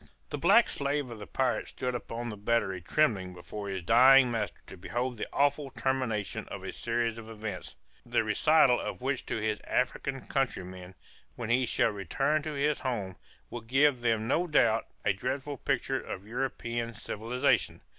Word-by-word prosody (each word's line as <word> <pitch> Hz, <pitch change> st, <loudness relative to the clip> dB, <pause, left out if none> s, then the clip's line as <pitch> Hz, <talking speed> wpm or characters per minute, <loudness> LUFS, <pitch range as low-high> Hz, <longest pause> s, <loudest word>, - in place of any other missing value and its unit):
The -, -, -2 dB
black -, -, +6 dB
slave 140 Hz, -2 st, -2 dB
of 115 Hz, -, -8 dB
the 105 Hz, -, -8 dB
pirate 130 Hz, -1 st, 0 dB
stood 125 Hz, 0 st, -3 dB
upon 120 Hz, 0 st, -4 dB
the 105 Hz, -, -5 dB
battery 105 Hz, -3 st, 0 dB
trembling 95 Hz, -, +1 dB
before 100 Hz, +4 st, -7 dB
his 95 Hz, -2 st, -4 dB
dying 125 Hz, +5 st, +7 dB
master 105 Hz, -5 st, -2 dB
to -, -, -10 dB
behold 120 Hz, +7 st, -3 dB
the -, -, -4 dB
awful 145 Hz, 0 st, +1 dB
termination 130 Hz, -7 st, -2 dB
of -, -, -7 dB
a -, -, -4 dB
series 115 Hz, -1 st, -1 dB
of 110 Hz, 0 st, -10 dB
events, 110 Hz, -1 st, -6 dB, 0.3 s
the -, -, +1 dB
recital 150 Hz, -6 st, +4 dB
of -, -, -5 dB
which 130 Hz, 0 st, -2 dB
to -, -, -1 dB
his 110 Hz, -1 st, -1 dB
African 135 Hz, +1 st, -1 dB
countrymen, 95 Hz, -8 st, -3 dB, 0.4 s
when 120 Hz, -2 st, -3 dB
he 125 Hz, +1 st, +3 dB
shall 115 Hz, -, +2 dB
return 135 Hz, -, 0 dB
to 155 Hz, +1 st, -4 dB
his 145 Hz, +1 st, +1 dB
home, 105 Hz, -8 st, -3 dB, 0.4 s
will 120 Hz, -, -5 dB
give 130 Hz, +3 st, +3 dB
them 115 Hz, -2 st, +1 dB
no 170 Hz, +7 st, +1 dB
doubt, 115 Hz, -8 st, +3 dB, 0.2 s
a 100 Hz, -, +4 dB
dreadful 140 Hz, +8 st, -3 dB
picture 135 Hz, +1 st, -1 dB
of 95 Hz, +1 st, -7 dB
European 120 Hz, -1 st, -3 dB
civilization. 120 Hz, +8 st, 0 dB
120 Hz, 170 wpm, -30 LUFS, 105-135 Hz, 0.4 s, dying